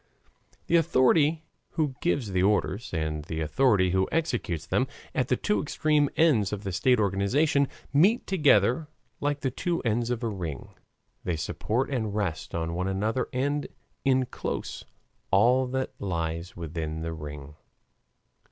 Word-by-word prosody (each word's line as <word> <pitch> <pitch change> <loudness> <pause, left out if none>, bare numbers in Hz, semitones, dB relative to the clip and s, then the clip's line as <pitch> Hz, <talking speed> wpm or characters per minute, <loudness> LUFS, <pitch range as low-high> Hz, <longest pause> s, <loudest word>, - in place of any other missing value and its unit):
The 170 - +4
authority 155 +1 +3 0.3
who 155 -5 0
gives 140 - 0
the 90 -1 +1
orders 105 +3 +1
and 80 -2 -2
the 80 -1 -4
authority 95 - +3
who 95 +1 +1
executes 120 - -1
them 125 +9 +1 0.3
at 125 - 0
the 125 - +2
two 210 - 0
extreme 150 -1 +1
ends 130 - +3
of 105 -1 -4
the 95 - -3
state 125 +7 +3
organization, 130 - +2 0.3
meet 190 +12 +4
together 145 - +3 0.3
like 145 0 -1
the 130 - 0
two 170 +5 -1
ends 115 0 0
of 125 -1 -2
a - - +1
ring; 85 - -5 0.5
they 90 - -1
support 110 - -2
and 110 -6 -2
rest 90 -7 -2
on 85 0 -2
one 90 +2 -1
another 110 +6 0
and 140 +3 -1 0.4
inclose 130 -2 -1 0.4
all 125 +6 +4
that 130 +1 -2
lies 85 -2 -3
within 80 -1 -4
the 80 0 -3
ring. 75 -2 -8
110 Hz, 145 wpm, -27 LUFS, 90-140 Hz, 0.5 s, The